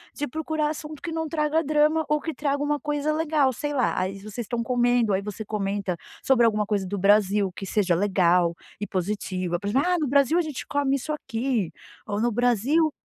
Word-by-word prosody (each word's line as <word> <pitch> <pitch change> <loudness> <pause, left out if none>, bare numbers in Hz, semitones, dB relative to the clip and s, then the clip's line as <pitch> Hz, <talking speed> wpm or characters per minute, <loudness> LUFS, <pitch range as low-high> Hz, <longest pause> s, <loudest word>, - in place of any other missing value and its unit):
de 290 - -2
procurar 315 +2 -1
assunto 305 -1 -7
que 340 - -5
não 320 0 -2
traga 310 0 +1
drama 305 +1 +3
ou 300 0 +2
que 320 - -4
traga 285 -1 -1
uma 295 0 0
coisa 295 +1 -1
legal 305 -4 +2
sei 290 +5 -3
lá. 255 -4 +1
Aí 185 +1 -2
vocês 215 +3 -9
estão 235 +1 -2
comendo. 245 -2 +2
Aí 190 - +1
você 210 +2 -6
comenta 200 -3 -2 0.3
sobre 250 -3 +4
alguma 215 -2 +2
coisa 205 -2 -1
do 200 +2 -3
Brasil 200 0 +3
que 195 - -6
seja 190 -3 +1
legal 180 -2 +3 0.3
e 205 - -2
positiva, 185 -2 -2
por 200 - -5
exemplo: 270 +9 +2
"Ah, 360 0 +2
no 300 - 0
Brasil 280 +4 +3
a - - +4
gente 305 -5 -5
come 285 -1 +1
isso 305 +4 -4
aqui" 240 - -2 0.4
ou 205 -1 -2
"no 240 +1 +2
Brasil" 245 +7 +2
245 Hz, 205 wpm, -25 LUFS, 205-295 Hz, 0.4 s, sobre